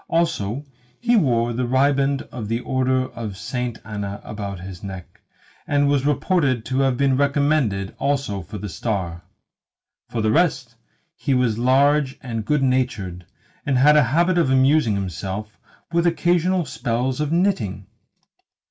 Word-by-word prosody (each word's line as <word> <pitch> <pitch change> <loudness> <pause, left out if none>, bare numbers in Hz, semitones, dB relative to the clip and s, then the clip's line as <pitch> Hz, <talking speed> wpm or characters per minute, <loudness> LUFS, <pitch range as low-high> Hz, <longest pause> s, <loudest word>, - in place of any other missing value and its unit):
Also, 145 -6 -1 0.3
he 240 0 +2
wore 120 - +2
the 125 +1 -1
riband 140 +1 +2
of 115 -5 -5
the 115 +2 -1
order 130 0 +1
of 110 -5 -6
Saint 120 +3 -3
Anna 100 -1 -5
about 100 -3 -6
his 90 0 -9
neck, 95 -3 -9 0.5
and 145 0 +2
was 140 -1 +2
reported 145 - +1
to 130 +1 -1
have 135 -2 +2
been 135 -1 +2
recommended 140 -8 +1
also 140 -8 -1
for 100 +6 -8
the 105 - -5
star. 90 -4 -3 0.9
For 115 -2 -2
the 110 - +2
rest, 145 -6 +1 0.4
he 140 -5 0
was 120 -3 +1
large 135 +2 +3
and 115 -4 -3
good 150 +3 +1
natured, 105 -10 -1 0.4
and 140 -5 +1
had 150 +4 +6
a 150 -3 +5
habit 175 +5 +3
of 165 - +2
amusing 130 -3 +3
himself 100 +2 -5 0.3
with 170 0 +2
occasional 175 +1 +2
spells 125 +2 -2
of 150 0 -1
knitting. 165 - 0
130 Hz, 150 wpm, -22 LUFS, 105-145 Hz, 0.9 s, had